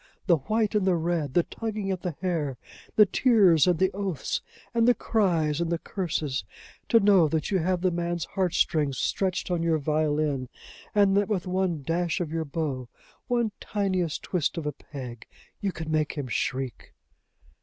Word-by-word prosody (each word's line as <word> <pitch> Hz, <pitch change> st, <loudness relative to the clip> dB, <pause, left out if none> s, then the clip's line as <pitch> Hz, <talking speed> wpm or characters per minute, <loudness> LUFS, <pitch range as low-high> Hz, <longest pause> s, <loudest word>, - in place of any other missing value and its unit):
the 175 Hz, -4 st, +5 dB
white 215 Hz, -, 0 dB
and 205 Hz, -3 st, +1 dB
the 185 Hz, -, +4 dB
red! 165 Hz, -4 st, -1 dB
the 175 Hz, -, +5 dB
tugging 215 Hz, -2 st, -4 dB
at 185 Hz, -2 st, -3 dB
the 175 Hz, -5 st, -3 dB
hair! 160 Hz, -8 st, -1 dB, 0.4 s
the 210 Hz, -, +8 dB
tears 195 Hz, -, +4 dB
and 180 Hz, -2 st, +3 dB
the 190 Hz, +3 st, +2 dB
oaths, 190 Hz, -7 st, -2 dB, 0.3 s
and 230 Hz, 0 st, +3 dB
the 245 Hz, -, +6 dB
cries 170 Hz, -8 st, +1 dB
and 170 Hz, 0 st, -1 dB
the 170 Hz, -, +1 dB
curses! 155 Hz, -7 st, -2 dB, 0.5 s
To 230 Hz, -, +6 dB
know 195 Hz, -5 st, +5 dB
that 155 Hz, +3 st, -1 dB
you 190 Hz, -, +3 dB
have 180 Hz, +1 st, 0 dB
the 185 Hz, -1 st, +2 dB
man's 175 Hz, 0 st, -2 dB
heart 185 Hz, -3 st, -1 dB
strings 145 Hz, -4 st, +1 dB
stretched 185 Hz, +3 st, -1 dB
on 175 Hz, -2 st, +1 dB
your 165 Hz, -1 st, +2 dB
violin, 150 Hz, -3 st, 0 dB, 0.5 s
and 200 Hz, -2 st, +5 dB
that 205 Hz, 0 st, +2 dB
with 195 Hz, -4 st, -1 dB
one 180 Hz, -4 st, -1 dB
dash 170 Hz, +4 st, 0 dB
of 170 Hz, -4 st, -3 dB
your 165 Hz, -1 st, -2 dB
bow, 140 Hz, -5 st, -3 dB, 0.4 s
one 240 Hz, -3 st, +1 dB
tiniest 185 Hz, -6 st, -1 dB
twist 175 Hz, -2 st, -1 dB
of 165 Hz, -, -3 dB
a 150 Hz, -, 0 dB
peg, 125 Hz, -6 st, -9 dB, 0.3 s
you 200 Hz, -, -1 dB
can 160 Hz, -2 st, -6 dB
make 155 Hz, -1 st, +1 dB
him 145 Hz, -3 st, -4 dB
shriek!" 125 Hz, +2 st, -3 dB
170 Hz, 180 wpm, -27 LUFS, 155-195 Hz, 0.5 s, the